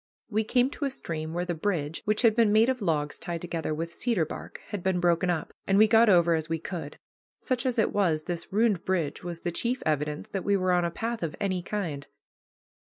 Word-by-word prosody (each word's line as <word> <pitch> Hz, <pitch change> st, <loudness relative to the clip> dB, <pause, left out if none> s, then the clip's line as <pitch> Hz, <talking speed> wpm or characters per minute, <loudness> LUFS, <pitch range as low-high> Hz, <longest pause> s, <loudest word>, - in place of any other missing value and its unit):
We 215 Hz, +1 st, +1 dB
came 250 Hz, +4 st, +2 dB
to 290 Hz, -, -3 dB
a -, -, +1 dB
stream 160 Hz, -11 st, -4 dB
where 175 Hz, +2 st, -2 dB
the 175 Hz, -, -2 dB
bridge, 160 Hz, -3 st, -2 dB
which 215 Hz, +3 st, +1 dB
had 230 Hz, -2 st, +6 dB
been 225 Hz, -2 st, +3 dB
made 220 Hz, +3 st, +5 dB
of 255 Hz, -2 st, -1 dB
logs 150 Hz, -6 st, 0 dB
tied 170 Hz, -1 st, -4 dB
together 165 Hz, -3 st, -3 dB
with 165 Hz, +2 st, -3 dB
cedar 225 Hz, -8 st, +1 dB
bark, -, -, -8 dB
had 205 Hz, -4 st, -4 dB
been 185 Hz, 0 st, +1 dB
broken 175 Hz, 0 st, +2 dB
up, 165 Hz, -2 st, -2 dB
and 195 Hz, -, +3 dB
we 215 Hz, -, +8 dB
got 225 Hz, 0 st, +5 dB
over 170 Hz, -3 st, +5 dB
as 160 Hz, -1 st, -1 dB
we 165 Hz, -, 0 dB
could. 160 Hz, -3 st, -6 dB, 0.5 s
Such 255 Hz, 0 st, 0 dB
as 250 Hz, -1 st, -1 dB
it 220 Hz, -, +2 dB
was, 165 Hz, -7 st, +1 dB
this 175 Hz, -1 st, -5 dB
ruined 210 Hz, -3 st, +2 dB
bridge 175 Hz, -6 st, -1 dB
was 170 Hz, -1 st, -6 dB
the 175 Hz, -, -2 dB
chief 240 Hz, +8 st, -1 dB
evidence 150 Hz, 0 st, -1 dB
that 195 Hz, -, -3 dB
we 200 Hz, 0 st, +2 dB
were 185 Hz, -1 st, +1 dB
on 175 Hz, -1 st, +3 dB
a -, -, 0 dB
path 230 Hz, +6 st, -4 dB
of 165 Hz, -3 st, -3 dB
any 190 Hz, -3 st, -1 dB
kind. 170 Hz, -7 st, -4 dB
180 Hz, 235 wpm, -28 LUFS, 165-215 Hz, 0.5 s, we